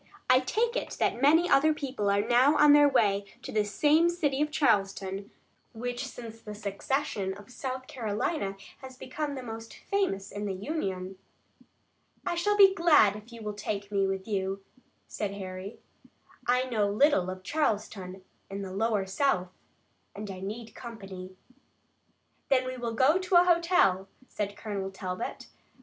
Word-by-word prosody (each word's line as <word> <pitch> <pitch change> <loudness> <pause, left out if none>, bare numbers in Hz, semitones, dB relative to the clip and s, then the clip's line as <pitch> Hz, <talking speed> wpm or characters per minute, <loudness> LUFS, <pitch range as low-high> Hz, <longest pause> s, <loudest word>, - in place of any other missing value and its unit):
"I 255 - +7
take 460 - 0
it - - -3
that 240 - +1
many 320 +5 +5
other 310 0 +4
people 255 -9 -2
are 200 +2 +1
now 255 +5 +5
on 295 -1 +7
their 290 0 +7
way 205 -6 +2 0.2
to - - -6
this 210 -1 0
same 310 +7 +4
city 295 -5 0
of 300 - +1
Charleston, 195 -8 0 0.4
which 245 +3 -4
since 230 -3 -9
the 210 -1 -8
secession 200 -1 -2
of 205 +3 -14
South 260 0 -5
Carolina 215 - -2 0.2
has 260 -1 -11
become 285 +3 -4
the 260 - -6
most 225 -1 -8
famous 290 - -2
in 205 +1 -4
the 195 - -2
Union." 190 - -4 1.1
"I - - 0
shall 415 +5 +1
be 390 -2 +8
glad 305 - +5
if 210 +3 -11
you 230 -1 -10
will 210 0 -3
take 205 0 -4
me 195 -1 +2
with 190 +1 -3
you," 195 -2 -2 0.4
said 200 -2 -4
Harry. 190 +1 -7 0.7
"I 250 +1 +3
know 220 -6 0
little 205 -4 +3
of 185 0 -7
Charleston 195 -8 -2 0.3
and 195 0 -5
the 185 - -7
lower 210 -1 0
South, 190 -2 0 0.7
and 205 -1 -6
I 185 - -8
need 215 +4 -6
company." 195 -7 -9 1.1
"Then 255 -2 +3
we 255 0 -4
will 235 -2 -4
go 285 +10 +4
to 370 0 -1
a 350 - +8
hotel," 335 - +3 0.2
said 205 -1 -4
Colonel 200 -3 -4
Talbot. 190 +2 -5
220 Hz, 160 wpm, -29 LUFS, 195-280 Hz, 1.1 s, be